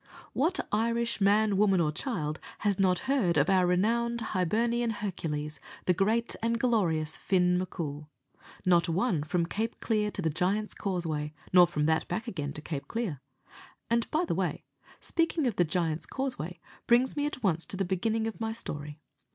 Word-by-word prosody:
What 325 +8 +1
Irish 230 +1 +1
man, 205 0 +4
woman, 195 -2 +4
or 155 -3 +2
child 155 - -3 0.2
has 200 -2 +1
not 180 -2 +2
heard 220 - +2
of 145 +5 +3
our 185 -2 +4
renowned 235 +6 +1
Hibernian 230 +6 +1
Hercules, 155 -9 -3 0.3
the 180 - +4
great 220 +6 +1
and 230 +1 0
glorious 170 -11 +1
Fin 180 -1 +2
M'Coul? 150 -5 -5 0.6
Not 175 -1 +4
one, 180 -1 +1
from 165 +3 0
Cape 220 +6 -3
Clear 215 -2 +1
to 195 - -3
the 160 - +1
Giant's 195 +7 0
Causeway, 160 -6 -2 0.2
nor 180 -1 +8
from 150 -3 -1
that 160 0 +1
back 225 +2 -3
again 150 -10 -3
to 150 - -8
Cape 145 -4 -5
Clear. 205 - -3 0.7
And, 235 0 +2
by 320 +4 +1
the - - -1
way, - - -1 0.4
speaking 330 -2 0
of 235 -5 0
the 175 - +4
Giant's 160 -1 -1
Causeway 215 - -3 0.3
brings 245 +2 +4
me 290 0 0
at 275 -4 -6
once 170 -4 +2
to 190 - -2
the 195 - 0
beginning 220 +5 0
of 225 0 -5
my 220 0 -1
story. 150 -9 -6
190 Hz, 175 wpm, -29 LUFS, 165-230 Hz, 0.7 s, nor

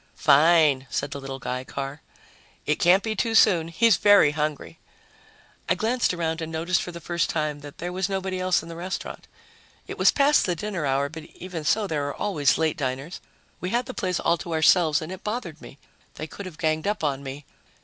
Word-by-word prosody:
"Fine," 150 -3 +4
said 140 - -3
the 140 - -6
little 135 0 -6
guy, 125 0 -4
Carr. 140 +2 -6 0.6
"It 150 - 0
can't 185 +3 +4
be 220 -1 -2
too 225 +3 -1
soon. 175 -7 +5
He's 205 +4 +3
very 205 -6 +6
hungry." 150 - -4 0.9
I 180 - +3
glanced 230 +6 0
around 165 -2 -2
and 160 0 -5
noticed 170 +2 0
for 180 - -6
the 170 - -8
first 170 +1 -1
time 150 -2 -2
that 145 0 -11
there 175 +1 -5
was 190 +1 -1
nobody 190 -1 -3
else 185 -2 +1
in 165 - -11
the 165 - -7
restaurant. 180 +3 -6 0.6
It - - -8
was - - +6
past 285 -3 +3
the 175 - 0
dinner 185 -4 -3
hour, 135 +1 +1
but, 155 +1 -9
even 180 -4 -7
so, 210 +8 +1
there 150 -6 -2
are 145 - -5
always 150 -11 +1
late 160 0 0
diners. 135 +4 -4 0.4
We 180 - -4
had 240 +4 0
the 255 - -7
place 185 -5 -2
all 170 - +2
to 170 - -5
ourselves 160 -1 +4
and 160 - -7
it 190 +1 -8
bothered 210 -8 -5
me. 135 - -12 0.4
They 155 - -5
could 190 +4 -9
have 165 -4 -11
ganged 155 +1 -1
up 210 -4 -1
on 140 -2 -1
me.... 140 +1 -8
165 Hz, 210 wpm, -25 LUFS, 150-185 Hz, 0.9 s, very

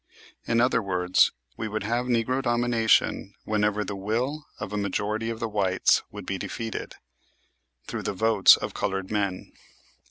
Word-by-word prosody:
In 115 0 +2
other 120 -1 +3
words, 90 -2 +2 0.3
we 110 - -3
would 110 -1 -3
have 120 +4 -1
"Negro 125 +2 +1
Domination" 120 -4 +1
whenever 105 -1 0
the 100 - -4
will 120 +10 -2
of 105 -1 -6
a - - -1
majority 105 +2 -1
of 115 -1 -4
the 115 - -2
whites 100 -4 +2
would - - -9
be - - -3
defeated 115 -1 -5 0.9
through - - -5
the - - -3
votes 110 0 +6
of - - -5
colored 95 0 -3
men. 100 -3 -2
110 Hz, 155 wpm, -26 LUFS, 100-115 Hz, 0.9 s, votes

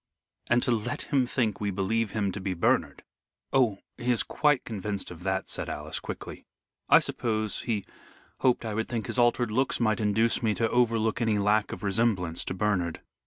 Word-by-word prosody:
"And 120 0 +3
to - - +1
let 115 +1 -1
him 135 -4 +1
think 115 -6 -1
we 100 - 0
believe 100 +3 0
him 100 -2 -1
to 100 - -6
be 95 -1 -2
Bernard." 85 - +1 0.5
"Oh, 120 -7 +3 0.2
he 125 +1 +1
is 120 - +3
quite 145 -3 +1
convinced 100 -3 -4
of 85 -1 -10
that," 95 +1 -1
said - - -1
Alice, - - -3
quickly. - - -8 0.4
"I - - +9
suppose 110 -3 -1
he 105 -4 -2 0.5
hoped 125 -2 +2
I 110 - -3
would 110 +1 -2
think 115 -4 -2
his 125 - -1
altered 120 -1 +3
looks 130 +4 +1
might 110 -2 +1
induce 110 +2 +2
me 110 -3 +1
to 115 - +1
overlook 115 -2 +2
any 110 -2 +2
lack 105 +1 +2
of - - -7
resemblance 100 -5 +1
to - - -3
Bernard." 90 -5 -1
110 Hz, 190 wpm, -28 LUFS, 100-120 Hz, 0.5 s, I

